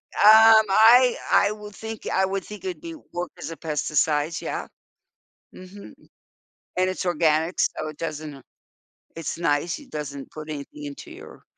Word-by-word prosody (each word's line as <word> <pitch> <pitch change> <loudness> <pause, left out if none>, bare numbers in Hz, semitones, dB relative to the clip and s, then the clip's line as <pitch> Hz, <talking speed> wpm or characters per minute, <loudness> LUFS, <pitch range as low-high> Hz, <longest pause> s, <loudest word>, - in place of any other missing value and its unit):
Um, 220 +1 +7
I 235 +5 +6 0.2
I 205 - +4
would 210 -1 -9
think 220 +2 -8
I 190 - +2
would 195 0 -3
think 210 - -10
it'd 365 -2 -5
be 335 -1 -8 0.2
work 175 0 -4
as 145 - -6
a 165 - -7
pesticides, 150 0 -1
yeah. - - -4 0.9
Mhm, 190 +2 -12 0.8
and 185 0 +2
it's 185 0 -4
organic 160 0 +1
so 155 - -1
it 155 - -9
doesn't, 155 -2 -6
uh 135 - -14 0.7
it's 165 0 -5
nice, 165 0 0
it 285 -3 -16
doesn't 140 -2 -6
put 155 0 -9
anything 150 0 -8
into 140 -1 -9
your - - -13
175 Hz, 160 wpm, -24 LUFS, 150-210 Hz, 0.9 s, Um